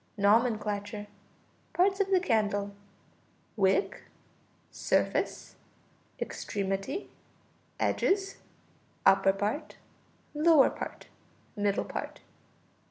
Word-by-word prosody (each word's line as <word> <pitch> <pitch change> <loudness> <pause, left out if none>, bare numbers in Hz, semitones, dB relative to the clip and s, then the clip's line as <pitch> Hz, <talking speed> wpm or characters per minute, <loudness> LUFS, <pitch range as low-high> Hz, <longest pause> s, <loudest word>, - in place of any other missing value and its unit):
Nomenclature. 210 -1 +1 0.7
Parts 385 +2 +2
of 395 -1 +1
the 380 -1 +4
candle: 205 - 0 0.8
wick, 195 - +1 0.7
surface, - - -1 0.6
extremity, 195 - -3 0.7
edges, 390 0 +1 0.7
upper 195 0 +6
part, 205 +9 -3 0.6
lower 305 -2 +5
part, - - -7 0.5
middle 205 -1 0
part. - - -6
210 Hz, 70 wpm, -29 LUFS, 200-330 Hz, 0.8 s, upper